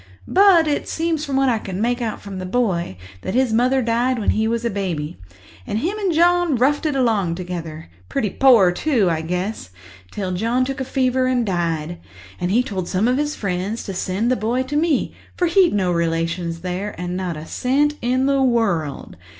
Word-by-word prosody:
But 375 -5 +5
it 290 - -1
seems 325 -2 -1
from 280 -3 -3
what 270 0 +3
I 235 -3 +2
can 190 -3 -6
make 240 +3 0
out 225 -2 -3
from 195 -2 -8
the 185 - -5
boy, 185 - -1 0.2
that 185 - -4
his 255 -3 +2
mother 255 +3 +2
died 240 +2 +1
when 215 - +1
he 220 +1 +1
was 235 +1 -1
a 235 - 0
baby, 170 - -3 0.5
and 210 - -2
him 345 - -1
and 390 -3 0
John 345 -1 +3
roughed 285 +6 +2
it 295 - -1
along 215 -10 +1
together—pretty 160 - -5
poor, 235 -9 +5
too, 210 - +1
I 160 -1 -1
guess—till 160 - -5
John 230 +7 0
took 270 +1 -4
a - - -2
fever 255 0 +1
and 250 -2 +1
died. 170 -3 -2 0.4
And 175 - -1
he 235 +6 +3
told 190 -8 -4
some 195 +4 +1
of 250 +1 +2
his 295 0 -1
friends 195 +3 -3
to 195 - -5
send 195 +6 -1
the - - +3
boy 240 +4 -1
to 275 +3 -5
me, 310 -2 +1 0.2
for 355 - +2
he'd 350 +1 +4
no 185 -3 +1
relations 165 0 -1
there 185 +2 -4
and 180 0 -3
not 180 -3 -3
a 155 - -8
cent 280 - +1
in 255 +2 +1
the 275 0 +2
world. 200 - 0
220 Hz, 200 wpm, -21 LUFS, 180-260 Hz, 0.5 s, But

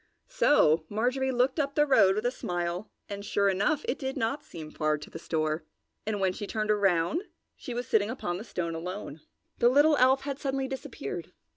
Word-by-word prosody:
So 230 - +4
Marjorie 255 +5 0
looked 255 +4 +1
up 280 -1 -1
the 295 - +4
road 200 -9 +5
with 215 +3 -2
a 245 - +2
smile 175 -3 -3 0.2
and, 200 -1 -6
sure 200 -1 +2
enough, 210 +11 +1
it 255 - -1
did 265 -1 -3
not 275 +6 -1
seem 155 - -9
so - - -20
far 155 0 +1
to 150 - -11
the - - -7
store, 155 0 -1 0.4
and 215 -2 -1
when 190 -1 +1
she 205 - -6
turned 215 0 -1
around, 200 - +2 0.3
she 245 - -7
was 245 +1 -2
sitting 215 -2 +2
upon 175 -8 -3
the - - -6
stone 175 -6 -3
alone. 165 -2 -6 0.4
The 240 - +6
little 290 +3 +5
elf 260 +2 +5
had 275 0 -4
suddenly 270 -1 -1
disappeared. 250 - -6
215 Hz, 200 wpm, -28 LUFS, 175-265 Hz, 0.4 s, The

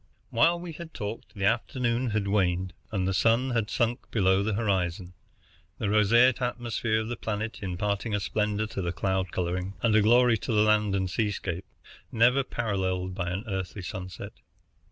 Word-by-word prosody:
While 165 +9 +3
we 175 -1 -7
had 160 +1 -10
talked 110 +2 -6
the 100 -1 -1
afternoon 120 +2 0
had 105 -2 -1
waned, 95 -2 +1 0.2
and 95 -4 0
the 95 - 0
sun 115 +6 +2
had 115 -3 0
sunk 120 +1 -1
below 95 -3 +3
the 105 0 -1
horizon, 90 -4 -1 0.6
the 105 - -1
roseate 115 +4 +4
atmosphere 120 -2 -1
of 110 - -5
the 120 - -3
planet 110 0 -4
imparting 100 +3 -2
a - - 0
splendor 105 +3 -1
to 105 -2 -5
the 85 0 -2
cloud 95 +1 -1
coloring, 90 +2 -2
and 115 -2 +3
a 110 - +6
glory 120 +1 +5
to - - -4
the 105 -1 +4
land 105 -2 +3
and 95 -1 0
sea 105 +1 +1
scape, 95 -3 -4 0.5
never 125 +4 +4
paralleled 95 -6 -2
by 90 -1 -3
an 95 +4 -3
earthly 95 -1 -4
sunset. 95 0 -7
105 Hz, 175 wpm, -27 LUFS, 95-115 Hz, 0.6 s, a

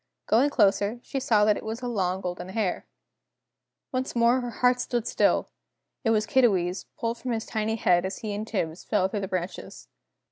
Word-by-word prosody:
Going 250 +6 +4
closer, 205 -2 +2
she 275 - -3
saw 215 -5 +3
that 210 -1 +3
it - - -7
was 225 +3 -5
a - - -2
long 190 -5 -1
golden 180 0 -5
hair. 195 -2 -2 1.0
Once 255 0 -2
more 235 +2 +4
her 245 - -4
heart 250 +2 +2
stood 240 -2 -2
still! - - +1 0.5
It 225 - +1
was 215 -1 +2
Kiddiwee's, 195 -8 +2
pulled 230 0 -2
from 250 -1 -3
his 225 -1 -3
tiny 220 0 -1
head 175 -5 +3
as 190 +1 -3
he 215 -2 -4
and 210 +2 -4
Tibbs 170 -6 -3
fell 190 -3 +1
through 205 - -2
the 195 - -3
branches. 185 -1 -5
215 Hz, 190 wpm, -26 LUFS, 190-235 Hz, 1.0 s, Going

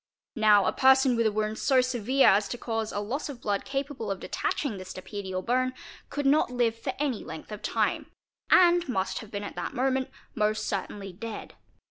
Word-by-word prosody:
Nowa 210 -3 +5
person 265 -1 +5
with 230 -1 +2
a - - +1
wound 215 +1 -2
so 265 -2 +3
severe 255 +1 +2
as 200 +1 +3
to 245 - -5
cause 225 -2 -3
a 205 - -2
loss 250 +9 -3
of 270 -4 -7
blood 205 -3 -1
capable 275 -4 -3
of 195 -1 -2
detaching 260 -9 -2
the 185 - -7
stapedial 185 0 -6
bone 255 +1 +1 0.4
could 290 -1 -3
not 285 0 +4
live 240 -2 +1
for 255 +3 -4
any 275 -6 -1
length 160 - -9
of 210 - -6
time - - -1 0.4
and 350 -3 +5
must 190 -6 -1
have 220 - -10
been 205 -1 -5
at - - -6
that - - -5
moment 260 +1 0 0.2
most 215 -1 0
certainly 195 0 -4
dead. 220 +3 -7
230 Hz, 190 wpm, -28 LUFS, 205-265 Hz, 0.4 s, Nowa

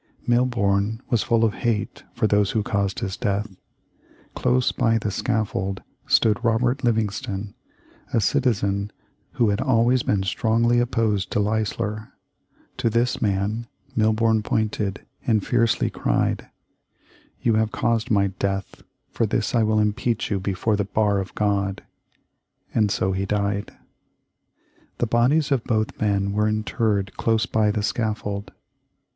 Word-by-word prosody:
Milborne 110 -4 +1
was 115 -4 +3
full 115 +3 +2
of 110 -2 +2
hate 115 -3 -2
for 115 -2 +1
those 105 -2 +3
who 110 0 0
caused 100 -2 -1
his 95 -1 -2
death. 105 -2 -2 0.8
Close 125 0 +1
by 115 0 +2
the 105 -2 -2
scaffold 100 -3 -2 0.2
stood 115 +2 +3
Robert 120 +3 +1
Livingston, 105 -3 -1 0.6
a - - +2
citizen 100 -2 +1 0.4
who 115 -3 +2
had 100 0 0
always 125 -1 +3
been 100 -4 0
strongly 115 +4 +2
opposed 110 -4 0
to - - +1
Leisler. 105 0 -2 0.6
To 115 - +1
this 120 +3 0
man 105 +3 -1 0.3
Milborne 110 0 +2
pointed, 105 -2 -1 0.2
and 110 -4 +2
fiercely 115 -2 +1
cried: - - 0 1.0
"You 115 - +3
have 110 0 +1
caused 115 0 0
my 100 -2 +3
death. 100 -1 -2 0.3
For - - 0
this - - -1
I 115 - +3
will 110 0 +2
impeach 110 +2 0
you 100 - +1
before 100 +3 0
the 100 - 0
Bar 105 -1 +1
of 95 -1 -6
God." 100 -2 0 0.9
And 105 -3 +2
so 95 -1 0
he 95 +1 -2
died. 100 0 -1 1.3
The - - +1
bodies 130 +7 +2
of 130 -4 +2
both 110 -2 -1
men 100 -2 +1
were 105 +1 +2
interred 110 -2 -1
close 115 0 +1
by 110 -2 +1
the 105 0 -1
scaffold. 105 -2 -2
110 Hz, 140 wpm, -23 LUFS, 100-115 Hz, 1.3 s, was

